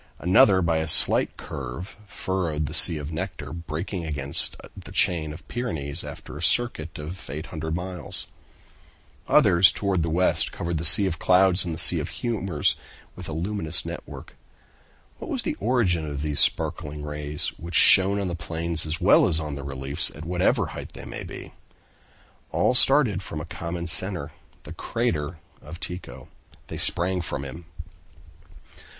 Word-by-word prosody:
Another, 95 - +3
by 85 -1 0
a 80 - -3
slight - - +4
curve, 70 +7 -8
furrowed 90 -7 -3
the - - -7
"Sea 80 - +8
of 75 +1 -7
Nectar," 75 -2 -6
breaking 85 +3 -6
against 70 -3 0 0.2
the - - -12
chain 80 -4 0
of 75 - -12
Pyrenees, 80 - -4
after - - -10
a 75 - -8
circuit 85 -7 0
of 80 +5 -9
800 80 +1 -6
miles. 90 0 -6 1.0
Others, 85 +2 +5
toward 100 -4 -2
the 80 - -2
west, 90 +3 +1
covered 85 -2 -4
the 80 - -3
"Sea 100 - +10
of 90 -4 -3
Clouds" 95 0 +4
and 85 -2 -4
the - - -2
"Sea 85 - +7
of - - -5
Humors" 100 -10 -2 0.4
with 90 -2 -9
a - - -6
luminous 85 0 -1
network. - - -9 0.8
What - - -9
was - - -2
the - - -2
origin 95 -10 0
of 70 0 -6
these 75 -2 +1
sparkling 75 0 0
rays, 75 +2 -1
which 85 0 -7
shone 95 +7 +6
on 100 - -3
the 90 - -4
plains 80 0 -3
as 80 +2 -2
well - - +4
as 80 -3 +3
on 75 -2 -5
the 70 0 -7
reliefs, 70 +1 -2
at 80 +2 -10
whatever 90 +2 0
height - - -9
they - - -10
might - - -8
be? - - -10 1.0
All - - +1
started 125 -6 +4
from 80 -4 -7
a 75 - -7
common 85 +1 -6
center, 85 -3 -1 0.3
the - - -10
crater 85 -9 -3 0.2
of 80 +3 -11
Tycho. 90 +1 -7 0.4
They - - -7
sprang 90 +1 -1
from 70 -5 -5
him. 80 +5 -10
85 Hz, 165 wpm, -24 LUFS, 75-95 Hz, 1.0 s, Sea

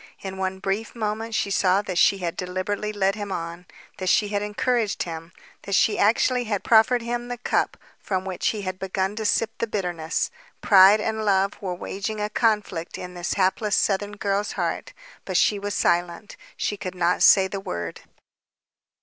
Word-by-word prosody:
In 190 -1 -6
one 190 0 -2
brief 195 +5 -3
moment 220 0 -3
she 200 - 0
saw 190 +1 +3
that 185 -4 -2
she 200 - +5
had 175 -2 -3
deliberately 185 +4 -3
led 195 -2 +1
him 205 -1 -6
on, 170 0 -5 0.3
that 185 -2 -2
she 205 +2 +3
had 205 -1 -1
encouraged 215 +1 0
him, 165 0 -7 0.3
that 200 - -2
she 215 - +3
actually 245 +4 +3
had 205 -3 -2
proffered 230 +2 +4
him 240 +1 -3
the 245 0 -4
cup 240 - 0 0.2
from 190 -1 -2
which 185 -2 -2
he 210 -2 -1
had 185 0 -4
begun 190 +1 -2
to 220 - -3
sip 220 +1 +1
the 230 - 0
bitterness. 175 -6 -2 0.3
Pride 195 +1 +7
and 220 0 -2
love 195 -1 +2
were 185 -3 -3
waging 200 +4 -4
a 210 0 -2
conflict 210 -7 0
in 180 0 -7
this 175 0 -3
hapless 200 +2 +1
southern 205 +1 0
girl's 205 +1 -1
heart. - - -3 0.3
But - - -1
she 205 - +3
was 205 0 -3
silent. 175 +4 0 0.2
She 205 - -2
could 185 -2 -6
not 180 0 +1
say 190 -1 +7
the 195 +1 -5
word. 85 - -5
200 Hz, 185 wpm, -24 LUFS, 185-215 Hz, 0.3 s, Pride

